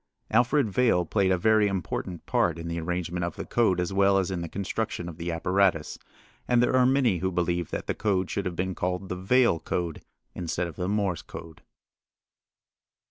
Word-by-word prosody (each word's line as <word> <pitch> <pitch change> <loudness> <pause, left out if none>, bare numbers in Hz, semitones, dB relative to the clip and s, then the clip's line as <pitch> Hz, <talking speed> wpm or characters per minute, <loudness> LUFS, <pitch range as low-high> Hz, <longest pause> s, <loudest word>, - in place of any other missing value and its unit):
Alfred 120 +4 +3
Vail 100 -3 +2
played 95 +2 +1
a 90 - +3
very 110 +2 +4
important 90 -2 -4
part 85 -1 +1
in 85 0 -6
the 85 0 -3
arrangement 90 +1 -3
of 85 -1 -3
the - - -6
code 110 -7 +2
as 90 +2 -1
well 100 0 +4
as 95 -1 0
in 90 -2 -3
the 85 - -5
construction 100 -1 -3
of 85 -2 -8
the 85 0 -3
apparatus, 90 0 +1 0.5
and 125 -1 +3
there 125 +1 +3
are 125 -1 +5
many 130 -9 +2
who 95 +2 -1
believe 85 -1 -1
that - - -4
the - - -1
code 95 -4 0
should 100 -1 -2
have 90 - -4
been 95 +2 -2
called 90 +1 -3
the - - -2
Vail 95 0 +3
code 85 -2 -3 0.3
instead 90 0 -2
of 85 - -7
the 90 0 -2
Morse 100 -5 0
code. 80 -1 -11
90 Hz, 195 wpm, -27 LUFS, 85-100 Hz, 0.5 s, are